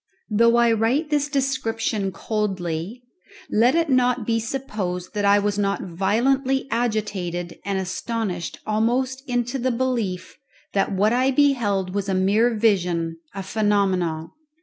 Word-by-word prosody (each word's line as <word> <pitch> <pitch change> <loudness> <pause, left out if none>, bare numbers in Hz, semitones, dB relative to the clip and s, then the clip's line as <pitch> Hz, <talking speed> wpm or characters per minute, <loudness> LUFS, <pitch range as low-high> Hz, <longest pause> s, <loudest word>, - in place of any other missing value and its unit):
Though 230 +2 +4
I 235 -1 +4
write 245 +8 +1
this 290 -1 +2
description 225 -7 -1
coldly, 190 0 -3 0.5
let 240 +6 +4
it 335 0 +2
not 250 -3 +2
be 230 0 +1
supposed 210 -7 -4
that 205 -1 -1
I 200 0 +6
was 205 0 0
not 200 0 0
violently 255 +10 +1
agitated 200 -7 -2
and 200 0 -2
astonished 190 -1 -3
almost 245 +5 0
into 245 +2 -1
the 255 +1 0
belief 235 -7 -2 0.3
that 195 +1 +1
what 205 +3 +2
I 255 +2 +3
beheld 235 -10 +2
was 200 0 -2
a 190 - +1
mere 200 +5 +3
vision, 175 -6 +1 0.2
a 195 - -4
phenomenon. 190 -6 0
215 Hz, 135 wpm, -23 LUFS, 190-245 Hz, 0.5 s, I